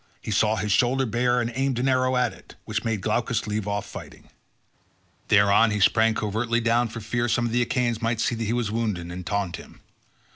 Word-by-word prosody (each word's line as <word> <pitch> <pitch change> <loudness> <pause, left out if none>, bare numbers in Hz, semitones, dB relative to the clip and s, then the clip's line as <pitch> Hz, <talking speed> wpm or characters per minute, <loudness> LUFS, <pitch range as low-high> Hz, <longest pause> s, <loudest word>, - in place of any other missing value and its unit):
He - - -6
saw 105 +1 +2
his 105 -1 -2
shoulder 125 +5 +2
bare 120 +1 +1
and 120 0 -1
aimed 135 0 -1
an 125 +2 0
arrow 130 0 +2
at 125 -2 +1
it, - - -16
which 110 0 -3
made 110 -4 -2
Glaucus 115 +2 -1
leave 105 -1 -3
off 100 0 -2
fighting. - - -11 1.0
Thereon 100 +2 +5
he 105 -1 -1
sprang 110 +3 +3
covertly 115 +3 -1
down 120 +1 +2
for 115 +1 -8
fear 120 +3 -1
some 120 +1 +1
of 115 - -2
the 120 +1 +2
Achaeans 120 -1 0
might 115 0 -1
see 115 - +1
that 115 0 -3
he 110 - -1
was 120 -4 -1
wounded 105 -7 -2
and 90 +1 -6
taunt 100 -2 -2
him. - - -14
115 Hz, 215 wpm, -24 LUFS, 105-120 Hz, 1.0 s, Thereon